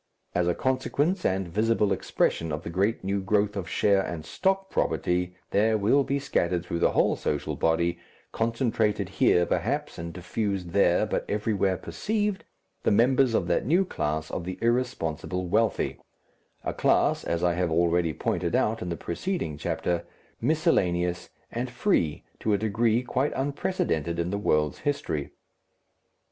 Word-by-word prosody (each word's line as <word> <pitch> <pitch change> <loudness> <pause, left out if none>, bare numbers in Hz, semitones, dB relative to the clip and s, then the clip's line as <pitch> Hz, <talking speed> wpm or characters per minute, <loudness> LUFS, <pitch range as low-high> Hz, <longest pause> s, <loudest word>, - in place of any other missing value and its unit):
As 90 0 +1
a 90 - +2
consequence 145 +7 0
and 95 -1 +1
visible 105 +2 +2
expression 80 -1 0
of 75 +1 -3
the 85 - -5
great 100 +6 0
new 100 +1 -1
growth 105 +1 +1
of 95 -3 -4
share 100 -2 +3
and 85 -4 -5
stock 195 0 0
property 90 0 0 0.2
there 110 +2 +3
will 115 +8 +3
be 140 +1 -1
scattered 90 -10 0
through 85 -1 -3
the - - +3
whole - - +3
social 75 - -2
body, 85 +1 +1 0.3
concentrated 115 -2 0
here 90 - +3
perhaps, 125 - -1
and 85 0 -5
diffused 90 0 -3
there, 90 -2 +3
but - - -1
everywhere 100 -3 +1
perceived, 210 - -2 0.4
the - - +2
members 125 +2 +4
of 85 - +1
that 85 0 +1
new 180 +6 +4
class 80 - -2
of 85 - -3
the 90 +1 -5
irresponsible 105 - -1
wealthy, 110 +5 +1 0.6
a - - -2
class, - - +2
as 85 0 -1
I 90 -1 +3
have 90 0 0
already 85 0 +2
pointed - - -1
out 110 +1 +1
in 90 - -3
the 85 - -3
preceding 85 - -3
chapter, 85 +3 -2 0.4
miscellaneous 90 - +1 0.2
and 125 +2 -3
free 105 - 0 0.2
to 110 - +1
a - - +4
degree 110 +3 +1
quite 130 +3 0
unprecedented 135 - -1
in 85 +1 -1
the 100 - -1
world's 75 -7 +1
history. 110 - -2
100 Hz, 155 wpm, -27 LUFS, 85-120 Hz, 0.6 s, members